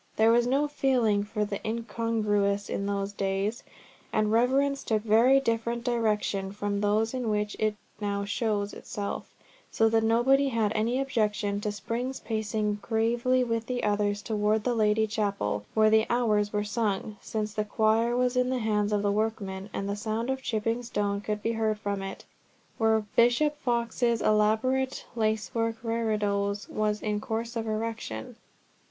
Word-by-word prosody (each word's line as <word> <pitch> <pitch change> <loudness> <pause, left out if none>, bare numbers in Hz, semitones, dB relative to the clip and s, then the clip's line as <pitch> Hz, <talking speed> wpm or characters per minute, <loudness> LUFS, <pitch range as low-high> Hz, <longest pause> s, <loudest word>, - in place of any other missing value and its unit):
There 220 +1 +5
was 240 +1 +3
no 280 +4 +2
feeling 245 -8 +2
for 210 0 -2
the 200 -1 -4
incongruous 215 -3 0
in 200 - -2
those 200 0 -2
days, 195 +3 -1 0.5
and 215 0 +1
reverence 270 +4 +2
took 215 -2 0
very 230 +5 +5
different 235 -1 -1
directions 210 -5 0
from 205 -1 -2
those 215 +3 +1
in 250 -3 -2
which 210 0 -1
it 215 -1 +1 0.2
now 200 -1 -2
shows 205 -1 -1
itself, 200 -1 -5 0.4
so 225 0 +3
that 225 0 +2
nobody 250 +5 +4
had 225 -4 +1
any 230 +4 0
objection 210 -6 0
to 210 - -1
Spring's 235 +6 -4
pacing 215 -1 -2
gravely 235 +3 +1
with 230 -1 -2
the 250 -1 -2
others 205 0 0
towards 215 -1 +1
the 245 - +1
Lady 220 -1 +3
Chapel, 200 - -2
where 215 0 +5
the 220 0 +4
Hours 215 -4 +2
were 210 -1 0
sung, 210 -1 -2
since 215 -1 -3
the 215 - 0
Choir 220 +3 +2
was 250 0 +1
in 250 0 +2
the 260 - 0
hands 210 -3 0
of 205 -1 +1
workmen, 205 -2 -1
and 195 - -3
the 200 - -1
sound 220 +4 -2
of 265 0 -3
chipping 225 0 -1
stone 205 -4 -2
could 210 0 -3
be 230 - +1
heard 220 -1 0
from 200 -1 -3
it, 195 0 -7 0.5
where 220 -1 +3
Bishop 245 +6 +4
Fox's 235 -2 0
elaborate 220 +6 +2
lace 220 -2 0
work 230 -1 0
reredos 210 -3 -1
was 210 -1 -1
in 210 -1 -1
course 230 +1 -3
of 225 -1 -2
erection. 215 - -4
220 Hz, 160 wpm, -28 LUFS, 210-235 Hz, 0.5 s, There